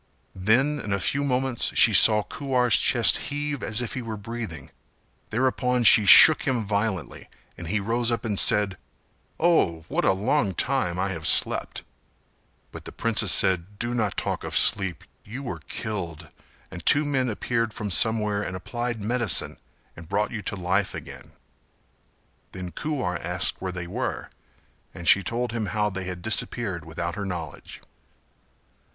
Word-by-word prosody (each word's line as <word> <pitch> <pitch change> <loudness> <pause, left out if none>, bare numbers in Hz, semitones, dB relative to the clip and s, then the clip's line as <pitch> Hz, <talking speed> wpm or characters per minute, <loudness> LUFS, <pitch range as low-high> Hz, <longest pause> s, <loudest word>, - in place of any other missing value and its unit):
Then 120 +10 +1
in 105 - -7
a 100 - -1
few 140 +8 -1
moments 130 -2 0
she 110 - +6
saw 105 +2 +6
Kuwar's 125 -3 0
chest - - +3
heave 145 0 -5
as 110 +2 0
if 120 - -6
he 130 - -5
were 115 -2 -7
breathing; 105 - -8 0.6
thereupon 125 +1 -1
she 110 -2 +7
shook 155 +9 +9
him 125 -4 -1
violently 100 -6 -4 0.3
and 85 - -10
he 105 +5 -1
rose 115 +3 0
up 115 0 -3
and 105 -3 +1
said 100 -4 +3 0.6
"Oh, 85 - +1
what - - -2
a - - +3
long 105 - -1
time 130 -10 -2
I 95 +2 -2
have 80 -4 -4
slept," - - +1 0.9
but - - -11
the - - -8
princess 110 -4 +2
said 95 +2 +2
"Do 120 +2 -4
not 110 -5 -2
talk - - -4
of - - -2
sleep; 95 -6 +4 0.2
you 125 +7 -9
were 125 - -7
killed 85 -8 -7 0.4
and 90 -3 -10
two 145 - +3
men 135 -3 -1
appeared 115 +1 -3
from 105 -2 -6
somewhere 105 +3 +1
and 95 - -6
applied 120 +3 -5
medicine 120 -3 +1 0.4
and 80 0 -13
brought 105 +2 -1
you 115 - -6
to 100 - -4
life 95 +1 -2
again;" - - -11 1.2
then 90 -1 -8
Kuwar 115 - -4
asked 85 -2 -2
where 95 - -4
they 90 -1 -7
were 85 - -5 0.6
and 85 - -8
she 100 - +5
told 120 +5 -4
him 110 -2 -4
how 105 +2 -2
they 95 0 -6
had 90 -1 -8
disappeared 100 -5 +1
without 85 +1 -5
her 100 +2 -6
knowledge. 85 -5 -8
105 Hz, 160 wpm, -24 LUFS, 90-120 Hz, 1.2 s, shook